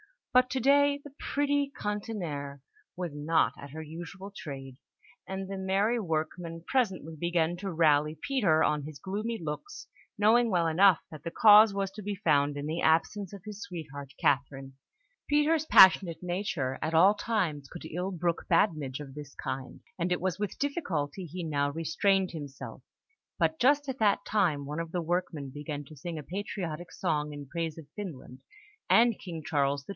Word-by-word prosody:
But 255 0 +5
to 265 - 0
day 285 +2 +4
the 290 - -11
pretty 285 0 0
cantinière 175 - -4 0.3
was 175 -2 -4
not 150 +3 +1
at 140 0 -10
her 160 +2 -6
usual 175 +5 -8
trade, 135 -8 -8 0.5
and 190 0 -4
the 195 0 -5
merry 195 +5 +1
workmen 165 -1 -3
presently 190 - -1
began 170 0 0
to 195 +2 -4
rally 155 -2 +3
Peter 195 - +2
on 150 -1 +1
his 150 0 -8
gloomy 210 - -3
looks, 160 - -6 0.3
knowing 225 +3 +4
well 175 -4 +2
enough 180 +2 +5
that 155 -2 -10
the 170 - -3
cause 210 +1 +7
was 195 -1 -2
to 210 - -9
be 205 0 -3
found 145 -7 +2
in 145 - -4
the 160 +3 -2
absence 175 +5 +1
of 195 -3 -10
his 210 -1 -8
sweetheart, 145 -7 -8
Catherine, 135 -1 0 0.6
Peter's 300 +2 +3
passionate 185 - +6
nature 175 -8 -2
at 160 - -2
all 185 +5 +6
times 185 -10 -1
could 170 - -10
ill 180 +4 -3
brook 170 -2 -1
badinage 150 -8 +1
of 135 -2 -9
this 145 -1 -10
kind, 130 0 -5 0.2
and 175 +1 -1
it 180 - -3
was 185 0 -1
with 210 -1 -3
difficulty 190 - -2
he 175 +2 -6
now 145 -3 0
restrained 185 +5 +1
himself; 145 -4 -8 0.6
but 315 - +1
just 285 +2 +3
at 265 - -4
that 205 -2 +2
time, 170 -9 +1
one 150 +3 -4
of 165 -1 -5
the 175 - 0
workmen 165 -5 -2
began 145 0 -5
to 155 +2 -14
sing 165 +4 -5
a 150 - -6
patriotic 175 -2 -5
song 150 -4 -1
in 145 -1 -7
praise 165 +2 -4
of 160 - -9
Finland, 150 -10 -7 0.5
and 230 -1 +5
King 165 -4 -7
Charles 140 -2 0
XII. - - -24
170 Hz, 175 wpm, -29 LUFS, 150-205 Hz, 0.6 s, cause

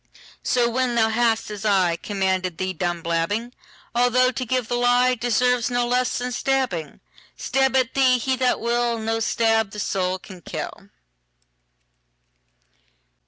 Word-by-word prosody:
So 245 -1 +2
when 245 0 0
thou 225 -1 +3
hast, 225 -1 +1
as 205 -2 -7
ICommanded 190 -2 0
thee, 185 0 -2
done 175 -1 -3
blabbing,—Although 235 +7 -1
to 255 0 -4
give 255 -1 0
the 245 - -3
lieDeserves 245 0 +2
no 245 0 0
less 250 +1 0
than 250 0 -3
stabbing,—Stab 265 - -2
at 260 -1 +2
thee 260 -2 +4
he 260 +2 0
that 255 -1 +1
will, 235 0 0
No 225 0 -2
stab 225 -1 +1
the 210 - -8
soul 185 -2 -1
can 185 -1 -13
kill. - - -7
235 Hz, 125 wpm, -23 LUFS, 195-250 Hz, -, thee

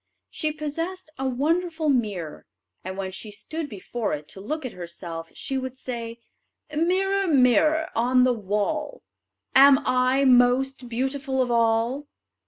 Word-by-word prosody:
She 310 -1 -1
possessed 320 +4 -5
a 270 - -1
wonderful 320 +5 0
mirror, 210 - -1 0.4
and 190 +1 -6
when 190 -1 -3
she 210 +3 -7
stood 310 +9 -6
before 215 +1 -4
it 150 0 -5
to 190 - -9
look 305 +8 -4
at 255 - -4
herself 170 -2 -7
she 270 -1 -3
would 260 0 -6
say: 235 -3 -5 0.6
"Mirror, 385 +4 +1
mirror 300 +2 +4
on 250 +2 +3
the 255 0 +4
wall, 220 +8 -2 0.5
Am 275 0 +8
I 255 +2 +2
most 250 0 +3
beautiful 265 +2 -2
of 250 -1 +1
all?" 230 +4 +1
255 Hz, 140 wpm, -25 LUFS, 225-300 Hz, 0.6 s, Am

